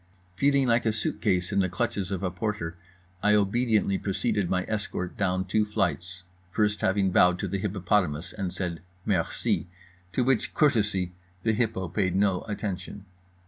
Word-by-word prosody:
Feeling 140 Hz, +4 st, +3 dB
like 115 Hz, 0 st, +3 dB
a -, -, +4 dB
suit 110 Hz, 0 st, -2 dB
case 90 Hz, -4 st, +1 dB
in 100 Hz, -, +2 dB
the 95 Hz, -1 st, +2 dB
clutches 90 Hz, +2 st, -1 dB
of 95 Hz, -1 st, -3 dB
a 90 Hz, -, 0 dB
porter, 90 Hz, -3 st, -3 dB, 0.5 s
I 105 Hz, 0 st, +4 dB
obediently 105 Hz, -1 st, +2 dB
preceded 100 Hz, -1 st, 0 dB
my 90 Hz, 0 st, +1 dB
escort 105 Hz, -4 st, -3 dB
down 95 Hz, -1 st, 0 dB
two 105 Hz, +3 st, +2 dB
flights, 90 Hz, -3 st, -2 dB, 0.3 s
first 105 Hz, +2 st, +1 dB
having 95 Hz, 0 st, +2 dB
bowed 90 Hz, 0 st, +5 dB
to 100 Hz, -, -3 dB
the 100 Hz, +2 st, -2 dB
hippopotamus 95 Hz, -5 st, 0 dB
and 95 Hz, -4 st, -3 dB
said 85 Hz, -4 st, -4 dB, 0.2 s
"Merci"—to 90 Hz, +1 st, -2 dB
which 130 Hz, -2 st, +1 dB
courtesy 105 Hz, -, +2 dB, 0.3 s
the 110 Hz, -, +2 dB
Hippo 110 Hz, -5 st, 0 dB
paid 95 Hz, +1 st, 0 dB
no 95 Hz, -2 st, +2 dB
attention. 100 Hz, -1 st, -4 dB
95 Hz, 155 wpm, -27 LUFS, 90-105 Hz, 0.5 s, bowed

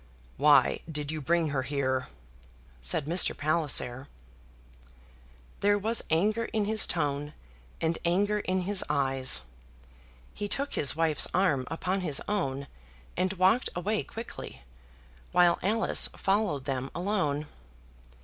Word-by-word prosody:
"Why 145 Hz, -2 st, +5 dB
did 150 Hz, -1 st, -3 dB
you 155 Hz, -1 st, -4 dB
bring 165 Hz, +2 st, +1 dB
her 140 Hz, -2 st, -1 dB
here?" 130 Hz, -1 st, -1 dB, 0.7 s
said -, -, +2 dB
Mr. 170 Hz, +4 st, 0 dB
Palliser. 145 Hz, -4 st, +1 dB, 1.5 s
There 205 Hz, 0 st, +3 dB
was 220 Hz, +3 st, 0 dB
anger 210 Hz, +8 st, +1 dB
in 215 Hz, -2 st, -1 dB
his 215 Hz, 0 st, +4 dB
tone, 145 Hz, -2 st, -2 dB, 0.5 s
and 165 Hz, 0 st, -1 dB
anger 200 Hz, +5 st, +1 dB
in 185 Hz, -2 st, -1 dB
his 195 Hz, +1 st, 0 dB
eye. 135 Hz, -1 st, 0 dB, 1.1 s
He 205 Hz, -, -4 dB
took 280 Hz, +7 st, 0 dB
his 140 Hz, -, +1 dB
wife's 160 Hz, -2 st, +2 dB
arm 150 Hz, -9 st, +2 dB
upon 185 Hz, +4 st, -2 dB
his 150 Hz, -6 st, 0 dB
own, 140 Hz, -10 st, -2 dB, 0.5 s
and 185 Hz, +2 st, 0 dB
walked 190 Hz, +6 st, +3 dB
away 205 Hz, +5 st, -1 dB
quickly, 220 Hz, -, -9 dB, 0.7 s
while 175 Hz, -1 st, +4 dB
Alice 220 Hz, +4 st, +4 dB
followed 195 Hz, -9 st, 0 dB
them 135 Hz, -1 st, -3 dB
alone. 175 Hz, -6 st, -1 dB
165 Hz, 120 wpm, -28 LUFS, 140-200 Hz, 1.5 s, Why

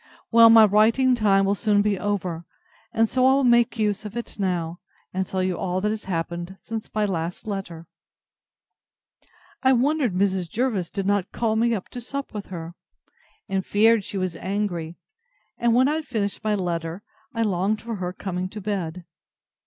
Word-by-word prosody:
Well, 230 Hz, 0 st, +8 dB
my 225 Hz, -1 st, +9 dB
writing 220 Hz, +5 st, +4 dB
time 200 Hz, -4 st, +3 dB
will 195 Hz, -, +2 dB
soon 205 Hz, 0 st, +2 dB
be 205 Hz, -2 st, 0 dB
over, 185 Hz, -5 st, -2 dB, 0.5 s
and 225 Hz, 0 st, +2 dB
so 255 Hz, +3 st, +1 dB
I 265 Hz, -, +6 dB
will 275 Hz, 0 st, +2 dB
make 240 Hz, -1 st, +4 dB
use 210 Hz, -1 st, 0 dB
of 210 Hz, +2 st, -7 dB
it 235 Hz, -, -6 dB
now, 175 Hz, -3 st, -1 dB, 0.3 s
and 190 Hz, 0 st, -1 dB
tell 185 Hz, -1 st, -1 dB
you 185 Hz, -1 st, -1 dB
all 185 Hz, -1 st, -1 dB
that 210 Hz, +2 st, 0 dB
has 215 Hz, -1 st, -5 dB
happened 175 Hz, +1 st, -4 dB
since 225 Hz, -1 st, -5 dB
my 215 Hz, -1 st, 0 dB
last 175 Hz, -3 st, -3 dB
letter. 190 Hz, -6 st, -5 dB, 1.8 s
I 265 Hz, -1 st, +4 dB
wondered 260 Hz, -, +1 dB
Mrs. 190 Hz, -2 st, 0 dB
Jervis 220 Hz, -7 st, -1 dB
did 195 Hz, -2 st, -3 dB
not 200 Hz, -1 st, 0 dB
call 225 Hz, -2 st, 0 dB
me 230 Hz, 0 st, +2 dB
to 245 Hz, -, -6 dB
sup 275 Hz, +2 st, -5 dB
with 210 Hz, -2 st, -6 dB
her, 170 Hz, -2 st, -7 dB, 0.7 s
and 195 Hz, 0 st, -1 dB
feared 220 Hz, +2 st, +3 dB
she 195 Hz, -, -5 dB
was 185 Hz, -2 st, -2 dB
angry; 185 Hz, -4 st, -3 dB, 0.6 s
and 235 Hz, -1 st, +3 dB
when 255 Hz, +2 st, +5 dB
I 300 Hz, +2 st, +1 dB
had 315 Hz, -2 st, -6 dB
finished 210 Hz, -5 st, -2 dB
my 215 Hz, -1 st, +1 dB
letter, 170 Hz, -1 st, -3 dB, 0.3 s
I 230 Hz, -, +1 dB
longed 200 Hz, +1 st, 0 dB
for 230 Hz, -2 st, -4 dB
her 180 Hz, -1 st, -3 dB
coming 185 Hz, -1 st, -4 dB
to 215 Hz, -, -8 dB
bed. 185 Hz, -4 st, -4 dB
205 Hz, 180 wpm, -24 LUFS, 185-225 Hz, 1.8 s, my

